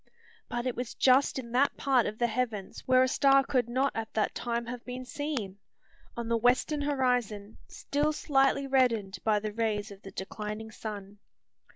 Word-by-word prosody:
But 240 0 -3
it 255 - -1
was 245 -1 -5
just 265 +2 +4
in 235 -3 -6
that 260 +4 +2
part 260 -4 +2
of 215 - -5
the 240 - +2
heavens 220 -4 -2
where 255 0 +6
a - - +3
star 275 +1 +4
could 250 -3 0
not 260 +3 +1
at 225 -1 -4
that 215 - +1
time 235 0 -2
have 240 0 -6
been 255 0 -6
seen, 250 -9 -4 0.6
on 235 -1 -3
the 230 0 +2
western 255 +6 +2
horizon, 245 -7 -1
still 295 +2 -1
slightly 275 -2 +2
reddened 230 -8 +1
by 215 -1 +3
the 210 0 -4
rays 215 -2 -1
of 200 0 -12
the 195 - -9
declining 210 +3 -6
sun. 205 -2 -7
240 Hz, 180 wpm, -29 LUFS, 215-265 Hz, 0.6 s, where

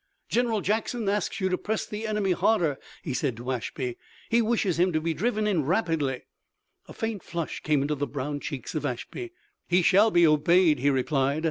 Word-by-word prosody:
"General 230 -3 +1
Jackson 220 +2 -1
asks 205 +1 -1
you 190 - +1
to 185 - 0
press 215 0 -2
the 215 +1 -5
enemy 210 -3 0
harder!" 175 -6 +2 0.2
he 145 - -3
said 125 -2 -1
to 125 +2 -4
Ashby. 125 0 -4 0.3
"He 235 +1 +4
wishes 215 -6 +1
him 180 +1 +3
to 155 - +2
be 165 +1 -1
driven 215 +5 0
in 190 -7 +1
rapidly!" 160 - 0 0.6
A - - -10
faint 225 -3 -3
flush 170 -2 -4
came 150 -3 +1
into 150 +2 0
the 145 0 -2
brown 145 +2 -4
cheeks 140 -4 -6
of 155 - -2
Ashby. 345 - -5 0.4
"He 180 +1 +3
shall 200 +5 +5
be 175 -4 +5
obeyed," 155 +2 +4
he 140 +3 +3
replied. 135 +1 +1
170 Hz, 195 wpm, -27 LUFS, 145-210 Hz, 0.6 s, shall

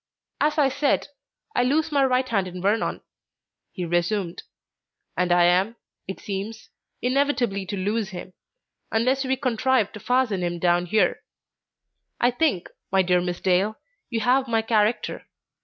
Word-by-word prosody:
"As 300 +1 +1
I 285 -3 +4
said, 285 +2 0 0.5
I - - +3
lose 300 +6 +1
my 280 -2 +3
right 255 0 +2
hand 195 -6 0
in 180 0 -7
Vernon," 205 +5 0 0.7
he 180 -3 -4
resumed, 175 +2 -1 0.7
"and 180 -1 0
I 175 0 +5
am, 185 +6 +3 0.3
it 190 - -6
seems, 205 +3 -6 0.3
inevitably 250 -7 +1
to 200 - -3
lose 205 +2 -1
him, 185 -1 -8 0.6
unless 255 +5 +2
we 265 0 +1
contrive 255 -3 +1
to 210 - -9
fasten 245 -4 +1
him 175 -1 -2
down 175 0 +2
here. 215 +5 +2 1.0
I 245 - +3
think, 245 - 0 0.2
my 190 0 +4
dear 180 0 +2
Miss 175 0 -3
Dale, 190 +4 +2 0.3
you 230 -2 -2
have 255 +3 +2
my 225 -1 +1
character. 220 0 0
215 Hz, 150 wpm, -24 LUFS, 185-255 Hz, 1.0 s, I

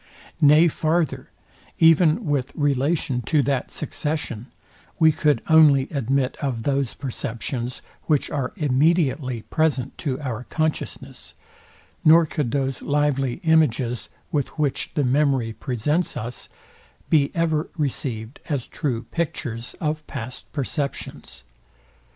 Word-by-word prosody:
Nay 150 +3 +7
farther, 160 0 0 0.5
even 165 +5 +5
with 140 -3 0
relation 140 -1 0
to 145 +5 +2
that 135 -2 -1
succession, 145 -6 -3 0.5
we 160 -2 +6
could 150 -5 +1
only 150 -4 +6
admit 135 -2 0
of 130 -6 -3
those 140 -2 0
perceptions, 125 -1 -4 0.2
which 150 -3 +2
are 135 -3 -2
immediately 145 - +1
present 145 -5 0
to 135 -4 -2
our 125 -4 -4
consciousness, 155 -1 -4 0.7
nor 165 +2 +7
could 145 -4 -2
those 135 0 -1
lively 140 -3 0
images, 130 -7 +2 0.2
with 145 -3 0
which 145 -3 -1
the 145 - +2
memory 130 -3 +2
presents 135 +9 -1
us, 120 +3 -6 0.6
be 145 -3 +4
ever 160 -2 0
received 125 -5 -3
as 140 -5 -1
true 125 -6 -3
pictures 125 -5 -4
of 155 -1 -2
past 125 -2 -7
perceptions. 140 0 -4
140 Hz, 115 wpm, -23 LUFS, 125-155 Hz, 0.7 s, Nay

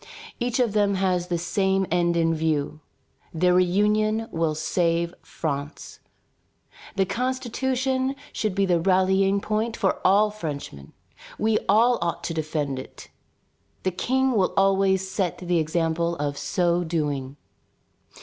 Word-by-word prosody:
Each 245 +1 -1
of 235 -5 +2
them 205 -2 +2
has 185 -2 0
the 175 -1 -1
same 190 +3 0
end 170 -1 +2
in 165 0 +2
view. 155 -2 -1 0.6
Their 180 +2 +3
reunion 210 +5 +2
will 165 -2 0
save 170 +2 0
France. 145 -1 -5 1.0
The 195 -1 +2
Constitution 260 +3 -1 0.2
should 215 -4 -2
be 200 0 +2
the 175 -2 +2
rallying 190 +2 +2
point 220 +2 -2
for 195 -3 0
all 205 +3 +4
Frenchmen. 145 - -7 0.4
We 215 0 +2
all 235 +4 +4
ought 170 0 -2
to 165 - -3
defend 150 -4 -2
it. 130 - -11 0.7
The 185 - +1
King 265 +8 +1
will 200 -6 +1
always 195 -1 +3
set 190 -2 -2
the 175 -1 0
example 165 +1 0
of 145 -2 -2
so 170 +5 0
doing." 145 -5 -2
185 Hz, 130 wpm, -24 LUFS, 165-210 Hz, 1.0 s, all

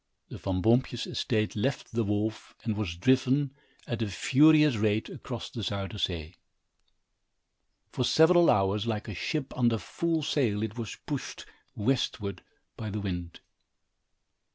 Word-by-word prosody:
The - - -8
Van 95 -2 -2
Boompjes 120 +1 +2
estate 110 -4 -1
left 130 +6 -2
the 115 0 0
wharf 105 +1 -2
and 110 -2 -1
was 100 -5 -3
driven, 130 +7 +2 0.3
at 120 -1 -3
a 110 - 0
furious 150 +8 +5
rate, 105 +1 +1
across 120 -4 -7
the 115 - -5
Zuyder 100 +1 -3
Zee. 85 -1 -3 1.5
For 125 - -1
several 170 +6 +5
hours, 100 +2 +2
like 110 -2 -2
a 105 - -5
ship 135 - -3
under 120 -2 +2
full 165 +7 -2
sail, 115 -8 +1
it 110 -1 -4
was 115 -3 -5
pushed 145 -3 -5 0.3
westward 105 -5 -1 0.3
by 110 - -5
the 105 +1 -3
wind. 90 -3 -5
110 Hz, 140 wpm, -29 LUFS, 100-130 Hz, 1.5 s, furious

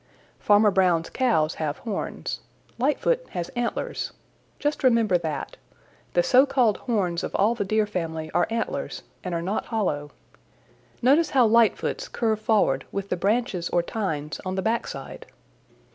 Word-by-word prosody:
Farmer 210 0 +5
Brown's 180 -4 +2
cows 220 -12 +2
have 150 -2 -1
horns. 215 -4 -4 0.4
Lightfoot - - +2
has 175 -2 -3
antlers. 240 -1 -3 0.4
Just 295 0 -2
remember 230 -6 +4
that. 155 -4 -4 0.6
The 175 - +3
so 260 +7 +5
called 250 -6 +2
horns 190 -8 -1
of - - -4
all 210 +4 +3
the 225 -3 -2
Deer 215 +2 +1
family 160 -5 -4
are - - +2
antlers 230 0 -3 0.2
and 180 -2 -3
are 170 - -2
not 195 +5 -2
hollow. 155 -10 -1 0.9
Notice 295 +5 +4
how 260 -5 +4
Lightfoot's 230 0 +2
curve 220 -2 0
forward 215 -1 +2
with 200 0 -4
the - - +1
branches 195 -2 0
or 175 - +2
tines 160 -8 -3
on 185 0 -3
the 190 - -1
back 230 +3 0
side." - - -8
205 Hz, 150 wpm, -25 LUFS, 175-235 Hz, 0.9 s, Farmer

